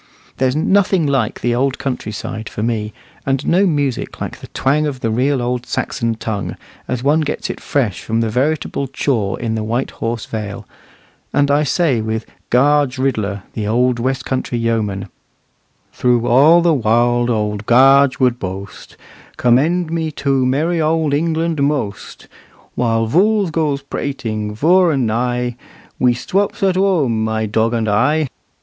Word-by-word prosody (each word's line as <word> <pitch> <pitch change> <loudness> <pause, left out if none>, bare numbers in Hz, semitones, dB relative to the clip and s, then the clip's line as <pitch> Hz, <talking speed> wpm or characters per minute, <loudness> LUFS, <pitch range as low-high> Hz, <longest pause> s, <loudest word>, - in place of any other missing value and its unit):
There's 130 0 +1
nothing 185 +1 +2
like 135 -6 0
the 120 - +1
old 135 +2 0
country 125 -5 -4
side 110 +1 -6
for 105 - -5
me, 110 -2 -1 0.3
and 135 +1 -1
no 190 +3 +3
music 145 -6 -2
like - - -5
the - - -10
twang 150 +3 0
of 135 -3 -5
the 115 - 0
real 130 +3 +1
old 125 0 -2
Saxon 115 -5 -2
tongue, 110 -2 -4 0.3
as 125 -1 -3
one 150 +3 +3
gets 150 -1 -3
it - - -9
fresh 120 -10 -1
from 115 0 -1
the 115 -1 0
veritable 140 +2 -1
chaw 120 -6 -1
in 115 -2 -3
the 110 -1 -2
White 120 +4 -2
Horse 115 -1 -4
Vale; 105 -2 -6 0.7
and 145 -1 +2
I 145 +1 +3
say 150 -4 +1
with 110 +1 -3 0.2
"Gaarge 140 +1 +3
Ridler," 105 -7 -1
the 105 -2 -3
old 120 +2 +1
west 130 +1 -1
country 130 -2 -2
yeoman, 110 -4 -1 0.9
"Throo 125 -1 +2
aall 140 +8 +5
the 170 -1 +4
waarld 120 0 +2
owld 105 -2 -2
Gaarge 135 +2 +5
would 125 -2 +2
bwoast, 95 +1 -7 0.4
Commend 155 +8 +2
me 165 -1 -1
to 135 -3 +1
merry 160 +6 +1
owld 155 -1 +1
England 160 +1 0
mwoast; 140 -8 -2 0.5
While 115 -2 +1
vools 200 - +2
gwoes 150 -4 -1
prating 110 -8 -4
vur 175 +8 +4
and 135 -5 +1
nigh, 120 +2 -1 0.4
We 125 -1 +3
stwops 195 +11 -1
at 190 -1 +3
whum, 160 - +1
my 110 0 -1
dog 110 +2 0
and 115 -1 -1
I." 130 +8 +2
125 Hz, 160 wpm, -18 LUFS, 115-150 Hz, 0.9 s, aall